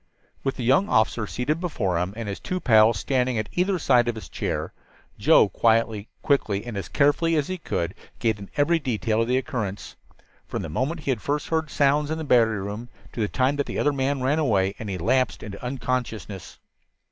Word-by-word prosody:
With 135 - -1
the 125 - -5
young 135 - +3
officer 110 0 +2
seated 150 +9 -1
before 105 - -1
him, 90 +3 -2
and 115 -2 -4
his 100 - -4
two 185 - -3
pals 110 - +5
standing 125 +1 0
at 110 -1 -2
either 185 +2 +1
side 120 -6 +3
of 120 - 0
his 110 - -9
chair, - - -3 0.5
Joe, - - +6
quietly, 115 -2 +1 0.2
quickly 110 -9 +1
and 120 -3 -6
as 100 - -4
carefully 150 +3 +2
as 150 0 0
he 185 -1 -3
could, 85 - -2 0.2
gave 110 -3 0
them 100 -1 -10
every 165 +3 +3
detail 115 -5 0
of 115 - 0
the 125 +1 +2
occurrence, 115 -8 -4 0.5
from - - -4
the 80 - -5
moment 140 - -2
he 140 - -1
had 120 -5 -2
first 145 +1 -2
heard 160 -1 0
sounds 145 +1 +2
in 160 - -1
the 160 - -4
battery 115 -7 +3
room, 105 +4 -6 0.2
to - - -7
the 105 - +1
time 130 +5 +1
that 145 - -1
the - - -4
other 145 - +2
man 135 0 -1
ran 145 +4 +2
away 100 -10 +2
and 110 - -5
he 95 - -3
lapsed 125 +8 +1
into 100 0 -8
unconsciousness. 125 -6 -4
125 Hz, 210 wpm, -25 LUFS, 110-145 Hz, 0.5 s, Joe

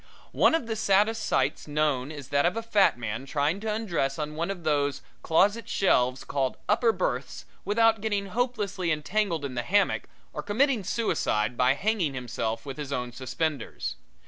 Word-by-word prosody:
One - - +4
of 325 - -1
the 225 -1 -3
saddest 215 +2 +2
sights 135 -5 0
known 150 -2 0
is 145 -4 -9
that 140 0 +2
of 180 - -1
a 230 - -2
fat 210 - +3
man 115 +3 -4
trying 145 +6 0
to 220 +1 -2
undress 175 -11 -1
on 150 -1 -3
one 165 +3 -2
of 190 -4 -5
those 145 -2 0 0.2
closet 205 +7 +2
shelves 130 -9 +2
called 135 -2 -1
upper 235 -2 +3
berths - - -3 0.2
without 225 +1 +3
getting 205 -2 -1
hopelessly 205 -6 -1
entangled 165 +1 0
in 135 - -5
the 120 - -1
hammock 200 +8 +1 0.3
or - - -4
committing 240 +1 +1
suicide 125 - 0
by 125 +2 +3
hanging 185 -6 0
himself 115 -2 -3
with 135 0 -6
his 145 -2 -5
own 125 -2 -2
suspenders. 130 - -3
160 Hz, 170 wpm, -27 LUFS, 135-210 Hz, 0.3 s, One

